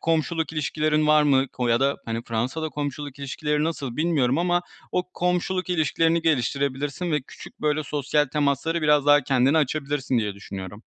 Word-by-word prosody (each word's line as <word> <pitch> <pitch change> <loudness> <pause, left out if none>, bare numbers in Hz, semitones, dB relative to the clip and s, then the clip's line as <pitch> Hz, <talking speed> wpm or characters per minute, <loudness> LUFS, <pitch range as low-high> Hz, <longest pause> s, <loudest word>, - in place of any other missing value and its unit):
komşuluk 160 0 0
ilişkilerin 155 0 0
var 150 0 +5
mı 135 -2 +3
ko 125 -2 -3
ya 115 +2 +3
da, 140 +1 +2
hani, 115 0 -3
Fransa'da 125 +8 -2
komşuluk 145 -1 -5
ilişkileri 150 +2 -1
nasıl 140 -7 -3
bilmiyorum 150 -5 +1
ama 175 0 +1 0.3
o 180 - +1
komşuluk 180 +1 -1
ilişkilerini 165 0 +2
geliştirebilirsin 140 +2 -1
ve 150 - +2
küçük, 130 - -13
böyle, 150 0 +1
sosyal 145 +1 +1
temaslara 145 +4 0
biraz 150 -1 +3
daha 145 0 +7
kendine 135 +4 +3
açabilirsin 145 -3 0
diye 105 -3 -2
düşünüyorum. 100 +1 -8
145 Hz, 160 wpm, -24 LUFS, 130-160 Hz, 0.3 s, daha